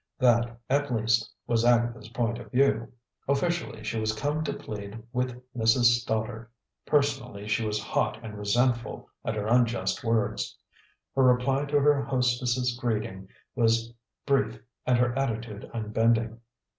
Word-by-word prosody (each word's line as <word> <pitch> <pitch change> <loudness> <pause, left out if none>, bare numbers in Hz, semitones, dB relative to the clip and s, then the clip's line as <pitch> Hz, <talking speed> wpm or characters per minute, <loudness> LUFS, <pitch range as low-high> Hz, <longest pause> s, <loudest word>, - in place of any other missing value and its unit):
That, 120 -2 +3
at 145 +1 +1
least, 115 0 +1
was 115 -1 +1
Agatha's 120 -2 +2
point 115 0 -1
of 110 -3 -11
view. 125 -3 +2 0.4
Officially, 140 -5 -1
she 110 +1 -2
was 110 0 0
come 145 +6 -1
to - - -1
plead 105 +1 -7
with 125 0 -1 0.2
Mrs. 120 +1 +4
Stoddard; 110 0 -3 0.4
personally, 135 -8 0
she 110 +1 +1
was 105 -1 -1
hot 110 0 0
and 110 -2 -7
resentful 120 +4 0 0.2
at 110 - -2
her 105 -1 -2
unjust 115 -5 +1
words. 115 -2 0 0.6
Her 135 - +3
reply 130 +2 +3
to 145 0 +2
her 145 0 +4
hostess' 125 -1 +1
greeting 105 -6 -2 0.2
was 115 -1 +2 0.3
brief 120 -5 +1 0.3
and 125 -1 +4
her 120 0 +2
attitude 115 -5 -3
unbending. 115 +1 +1
120 Hz, 140 wpm, -27 LUFS, 110-125 Hz, 0.6 s, Mrs